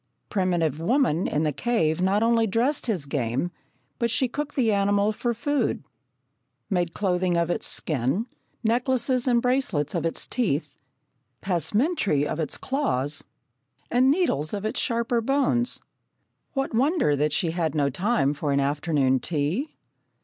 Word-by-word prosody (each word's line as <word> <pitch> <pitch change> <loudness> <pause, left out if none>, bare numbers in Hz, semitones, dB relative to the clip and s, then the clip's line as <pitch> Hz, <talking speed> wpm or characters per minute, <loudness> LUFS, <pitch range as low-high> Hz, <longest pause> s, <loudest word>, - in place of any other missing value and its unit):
Primitive 175 -6 0
woman 190 - +2
in 150 - 0
the 155 - +1
cave 165 - 0
not 195 +3 +2
only 230 -1 +3
dressed 245 +8 0
his 185 -11 -1
game, 135 +3 -1 0.5
but 235 - +1
she 255 +3 +2
cooked 295 +4 -5
the 230 -5 +2
animal 200 +1 +2
for 235 +3 -2
food, 285 +5 -1 0.9
made 175 -3 0
clothing 180 -3 +1
of 170 0 +1
its - - -1
skin, 145 - 0 0.4
necklaces 250 +2 +1
and 240 -2 +3
bracelets 250 - 0
of - - -1
its 165 - -2
teeth, 180 - -1 0.7
passementerie 195 - +1
of 150 - -3
its 155 - -2
claws, 150 - -1 0.7
and 255 +2 +4
needles 275 - +1
of 205 +1 -5
its 215 - -1
sharper 235 0 +1
bones. 250 -1 +1 0.7
What 270 -3 -2
wonder 265 - +2
that 150 +2 +1
she 160 +3 +1
had 165 -3 -1
no 140 -2 +1
time 155 - +1
for 145 0 -2
an 140 - +2
afternoon 140 -2 +1
tea? 165 - -1
195 Hz, 145 wpm, -25 LUFS, 155-245 Hz, 0.9 s, and